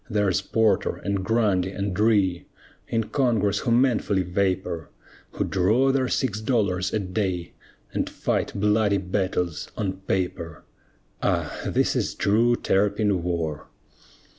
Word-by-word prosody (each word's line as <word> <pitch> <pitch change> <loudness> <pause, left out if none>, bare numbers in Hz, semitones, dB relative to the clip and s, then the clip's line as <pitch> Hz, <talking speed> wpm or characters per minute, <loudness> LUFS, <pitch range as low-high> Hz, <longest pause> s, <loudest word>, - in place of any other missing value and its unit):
There's 105 -5 +1
Porter 110 -2 +1
and 100 -1 -2
Grundy 100 -4 +1
and 100 0 -3
Rhea, 100 -5 +2 0.4
In 115 0 0
Congress 110 -4 +1
who 125 - -2
manfully 115 -6 +2
vapor, 90 -2 -1 0.4
Who - - -1
draw 110 +9 +2
their 130 -1 +1
six 110 -5 -1
dollars 100 -6 0
a - - +1
day, 95 -3 -2 0.4
And - - -1
fight - - -1
bloody 105 0 +3
battles 90 -3 -2
on 100 -3 -1
paper! 85 -4 -2 0.6
Ah! - - -1
this - - +1
is - - -1
true 115 +4 +3
Terrapin 100 -2 +1
war. 85 -4 -3
100 Hz, 125 wpm, -25 LUFS, 90-110 Hz, 0.6 s, bloody